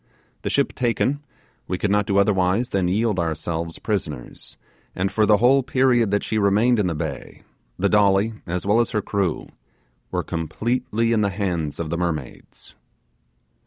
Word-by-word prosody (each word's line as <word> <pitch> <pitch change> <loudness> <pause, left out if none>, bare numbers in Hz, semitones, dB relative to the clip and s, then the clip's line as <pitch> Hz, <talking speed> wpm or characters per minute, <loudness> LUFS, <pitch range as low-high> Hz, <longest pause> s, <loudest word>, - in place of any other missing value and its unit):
The - - -3
ship - - +1
taken, 130 +4 0 0.4
we 90 - -2
could 100 +2 -1
not 105 -1 +2
do 100 - +1
otherwise 100 +3 +2
than 95 -2 +1
yield 105 +1 +1
ourselves 85 0 -3
prisoners, 80 - -5 0.4
and 95 +2 -1
for 105 +2 +2
the 105 - +5
whole 130 +5 +4
period 130 -4 +2
that 100 +1 0
she 110 - -1
remained 105 +4 +3
in 100 - +1
the 85 - -2
bay, 75 - -6 0.3
the 100 - +1
Dolly, 100 +1 +3
as 90 +2 -3
well 105 +3 +3
as 120 - +2
her - - +1
crew, 95 -6 -2 0.6
were - - -2
completely 115 - -1
in 110 - +2
the 100 - +2
hands 90 -7 -2
of 80 -2 -3
the 85 - -1
mermaids. 80 -7 -5
100 Hz, 165 wpm, -22 LUFS, 90-115 Hz, 0.6 s, the